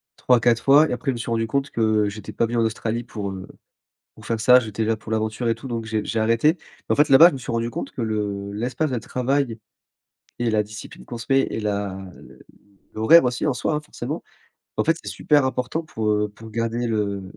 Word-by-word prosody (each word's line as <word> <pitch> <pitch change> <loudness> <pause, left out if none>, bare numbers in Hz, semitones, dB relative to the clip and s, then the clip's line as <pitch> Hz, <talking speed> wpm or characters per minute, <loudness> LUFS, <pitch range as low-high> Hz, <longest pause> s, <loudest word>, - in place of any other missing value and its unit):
3-4 120 -2 +2
fois 145 +3 +6
et - - -1
après, 130 +3 -1
je - - -3
me 120 - -5
suis 115 - -5
rendu 115 -1 0
compte 140 +5 -1
que 110 -2 +1
j'étais 105 0 -8
pas 115 - +1
venu 120 +1 -2
en - - +3
Australie 115 +1 -2
pour, 105 -4 -5
heu, 95 -1 -8 0.7
pour 110 - -14
faire 115 0 -2
ça. 125 +3 +7
J'étais 110 -1 -3
là 110 0 0
pour 110 0 -6
l'aventure 110 +2 -1
et 115 - +2
tout 130 +3 -9
donc 115 -1 -3
j'ai 110 -1 -2
j'ai 115 - -2
arrêté. 115 +10 +3 0.3
Mais, - - +4
en - - +1
fait, 150 - +5
là-bas, 150 +6 +8
je - - -7
me - - -4
suis 125 - -6
rendu 115 0 -1
compte - - -5
que - - -6
le 105 -3 -2
l'espace 125 +8 -2
de 125 - -1
travail 125 0 -1 0.8
et 120 -1 0
la 110 -1 +2
discipline 105 +1 -11
qu'on 120 - -6
se 115 - -7
met 135 0 +4
et - - -3
la 100 -2 -2 0.2
le - - -16 0.5
l'horaire 130 +9 +6
aussi 125 +4 -1
en 140 - +1
soi, 150 +5 -1
hein, 150 - -1
forcément, 150 - -6 0.6
en - - +2
fait, - - +2
c'est - - -5
super 145 -3 +2
important 130 +5 -2
pour, 110 -8 -3
heu, 105 0 +1
pour 110 +2 -13
garder 115 +2 -2
le 100 -3 -1
115 Hz, 240 wpm, -23 LUFS, 110-125 Hz, 0.8 s, là-bas